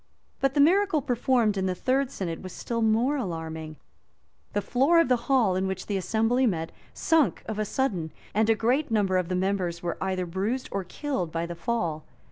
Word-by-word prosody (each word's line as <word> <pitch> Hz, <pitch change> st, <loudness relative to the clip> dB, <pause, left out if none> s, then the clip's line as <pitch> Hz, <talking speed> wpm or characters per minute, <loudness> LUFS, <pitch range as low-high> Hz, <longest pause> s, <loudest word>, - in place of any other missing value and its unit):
[*] -, -, -42 dB
But 270 Hz, -1 st, +1 dB
the -, -, +2 dB
miracle 345 Hz, 0 st, +4 dB
performed 240 Hz, -4 st, +1 dB
in 190 Hz, 0 st, 0 dB
the 185 Hz, -, -1 dB
third 265 Hz, +6 st, +1 dB
synod 170 Hz, -9 st, -4 dB
was 185 Hz, -1 st, -8 dB
still 230 Hz, -1 st, -3 dB
more 230 Hz, +6 st, +2 dB
alarming: 160 Hz, -, -5 dB, 0.8 s
the 205 Hz, -, +1 dB
floor 280 Hz, +7 st, +3 dB
of 330 Hz, -, +3 dB
the 250 Hz, -, +5 dB
hall 235 Hz, -9 st, +4 dB
in 190 Hz, +1 st, 0 dB
which 190 Hz, -1 st, -4 dB
the 205 Hz, -, -2 dB
assembly 225 Hz, +6 st, +1 dB
met, 165 Hz, -6 st, -2 dB, 0.2 s
sunk 320 Hz, -5 st, +1 dB
of 220 Hz, -1 st, -4 dB
a 215 Hz, -, 0 dB
sudden, 190 Hz, -, -1 dB, 0.2 s
and 220 Hz, +2 st, +2 dB
a 225 Hz, -, +5 dB
great 250 Hz, +7 st, +1 dB
number 200 Hz, -4 st, +2 dB
of 180 Hz, -1 st, -1 dB
the 185 Hz, -, 0 dB
members 180 Hz, -2 st, -1 dB
were 170 Hz, -, -3 dB
either 185 Hz, -1 st, -1 dB
bruised 200 Hz, +9 st, -2 dB
or 195 Hz, -1 st, -2 dB
killed 185 Hz, -, -3 dB
by 165 Hz, +1 st, -2 dB
the 170 Hz, -, -5 dB
fall. 170 Hz, -5 st, -2 dB
210 Hz, 205 wpm, -27 LUFS, 180-255 Hz, 0.8 s, the